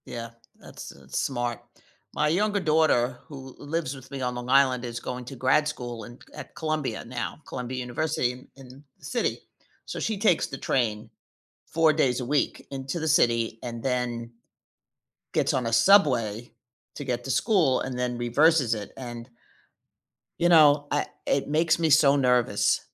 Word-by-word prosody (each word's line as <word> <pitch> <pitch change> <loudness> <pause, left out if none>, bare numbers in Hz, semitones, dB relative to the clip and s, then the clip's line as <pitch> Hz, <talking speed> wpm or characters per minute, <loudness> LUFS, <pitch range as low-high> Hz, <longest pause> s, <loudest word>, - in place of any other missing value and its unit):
Yeah, 115 -1 -7 0.3
that's - - -10
that's 70 -1 -6
smart. 120 -3 -2 0.5
My 150 - +1
younger 205 +6 +1
daughter 150 -7 +2
who 135 -4 -10
lives 145 -2 -3
with 130 -1 -14
me 135 -1 -5
on 125 -1 -2
Long 120 0 -6
Island 130 -2 +4
is 120 -1 -5
going 125 +1 -6
to 135 - -8
grad 130 +4 +2
school 120 -6 -5
in 120 +4 -12 0.2
at - - -10
Columbia 155 -7 -3
now 120 +5 -5
Columbia 125 +1 -5
University 125 +1 -1
in 125 +1 -13
in 135 +1 -14
the - - -15
city, 240 - -1 0.5
so, - - -6
she 220 -2 -2
takes 200 -5 +2
the 135 - -7
train 110 -5 -1 0.6
4 160 -1 +3
days 135 -5 +1
a 125 - -4
week 145 +3 -1
into 135 +4 -4
the 160 - -2
city 115 -5 +2
and 120 -1 -6
then 125 -2 -2 1.0
gets - - +1
on 125 -3 0
a 115 - -2
subway 120 - +3 0.4
to 145 - -6
get 120 -2 -2
to - - -6
school 180 - +2
and 130 -1 -4
then 125 -1 -1
reverses 130 +2 +3
it 105 -2 -5
and 120 -1 -8 1.1
you 175 - +3
know, 150 -3 +6
I 145 - +1 0.2
it 135 - 0
makes 160 +2 +2
me 165 -1 +2
so 145 -2 +5
nervous. 125 -3 +2
130 Hz, 165 wpm, -26 LUFS, 120-150 Hz, 1.1 s, know